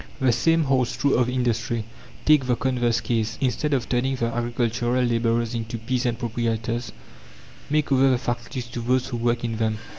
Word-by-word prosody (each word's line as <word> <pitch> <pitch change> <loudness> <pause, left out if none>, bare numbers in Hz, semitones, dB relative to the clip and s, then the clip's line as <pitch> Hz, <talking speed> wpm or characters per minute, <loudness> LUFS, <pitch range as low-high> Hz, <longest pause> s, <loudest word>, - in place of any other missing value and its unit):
The 130 -2 +3
same 165 +7 +3
holds 130 -3 +1
true 140 - +2
of 125 0 +2
industry. 115 -3 -1 0.4
Take 150 -4 +5
the 125 - +3
converse 120 -2 0
case: 110 -2 -1
instead 135 +3 0
of 130 -4 0
turning 130 +2 0
the 115 -2 -1
agricultural 120 +1 0
labourers 115 -1 +1
into 115 0 -3
peasant 120 +1 -1
proprietors, 115 0 -2 0.8
make 150 -1 +1
over 135 0 +5
the 130 - +3
factories 120 +1 -4
to 120 - -5
those 130 +2 +1
who 120 - -3
work 120 0 0
in 115 -2 -2
them. 110 -1 0
120 Hz, 175 wpm, -24 LUFS, 115-130 Hz, 0.8 s, Take